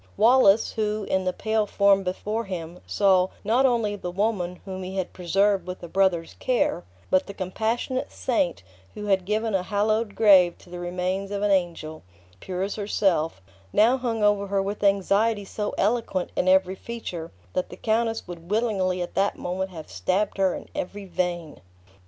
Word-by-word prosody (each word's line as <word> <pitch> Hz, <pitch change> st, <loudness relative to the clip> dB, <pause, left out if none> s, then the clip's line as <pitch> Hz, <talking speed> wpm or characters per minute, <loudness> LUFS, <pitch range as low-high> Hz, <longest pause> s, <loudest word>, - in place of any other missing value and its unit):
Wallace, 225 Hz, -2 st, +5 dB
who, 215 Hz, -1 st, -1 dB
in 190 Hz, -1 st, 0 dB
the 185 Hz, -, +2 dB
pale 220 Hz, +2 st, 0 dB
form 200 Hz, -1 st, +4 dB
before 210 Hz, +5 st, -3 dB
him, 175 Hz, -2 st, -6 dB
saw, 190 Hz, -2 st, +3 dB, 0.2 s
not 240 Hz, +6 st, +3 dB
only 230 Hz, -4 st, 0 dB
the 180 Hz, -3 st, -5 dB
woman 180 Hz, -2 st, -1 dB
whom 190 Hz, -1 st, -6 dB
he 185 Hz, +1 st, -6 dB
had 185 Hz, -, -3 dB
preserved 195 Hz, +1 st, +1 dB
with 180 Hz, 0 st, -6 dB
a -, -, -5 dB
brother's 175 Hz, -2 st, +1 dB
care, 245 Hz, -, +1 dB, 0.3 s
but 185 Hz, -, +3 dB
the 200 Hz, -, -8 dB
compassionate 225 Hz, +7 st, -2 dB
saint, 190 Hz, -, -1 dB, 0.3 s
who 210 Hz, -, -6 dB
had 190 Hz, -3 st, +2 dB
given 215 Hz, +2 st, -1 dB
a 190 Hz, -, +2 dB
hallowed 210 Hz, +2 st, 0 dB
grave 185 Hz, -5 st, +6 dB
to 175 Hz, -, -18 dB
the 175 Hz, -, -6 dB
remains 180 Hz, +2 st, -2 dB
of 200 Hz, 0 st, -3 dB
an 205 Hz, -, +2 dB
angel, 170 Hz, -4 st, -1 dB, 0.4 s
pure 185 Hz, -, -3 dB
as 200 Hz, +2 st, -3 dB
herself, 180 Hz, -, 0 dB, 0.3 s
now 225 Hz, -, +5 dB
hung 235 Hz, -4 st, -2 dB
over 205 Hz, -1 st, +3 dB
her 200 Hz, 0 st, 0 dB
with 205 Hz, +1 st, -4 dB
anxiety 200 Hz, +2 st, +2 dB
so 210 Hz, +1 st, -4 dB
eloquent 205 Hz, -4 st, 0 dB
in 180 Hz, -, 0 dB
every 190 Hz, 0 st, +4 dB
feature 190 Hz, -6 st, -6 dB, 0.2 s
that 185 Hz, -, -1 dB
the -, -, -10 dB
countess 225 Hz, -1 st, 0 dB
would 170 Hz, -1 st, -9 dB
willingly 195 Hz, -5 st, 0 dB
at 175 Hz, -, -8 dB
that 195 Hz, +1 st, +1 dB
moment 190 Hz, +2 st, -3 dB
have 160 Hz, -4 st, -9 dB
stabbed 190 Hz, -, -1 dB
her 190 Hz, -2 st, +2 dB
in -, -, -8 dB
every 200 Hz, +2 st, -5 dB
vein. 175 Hz, -4 st, -3 dB
195 Hz, 175 wpm, -25 LUFS, 180-215 Hz, 0.4 s, grave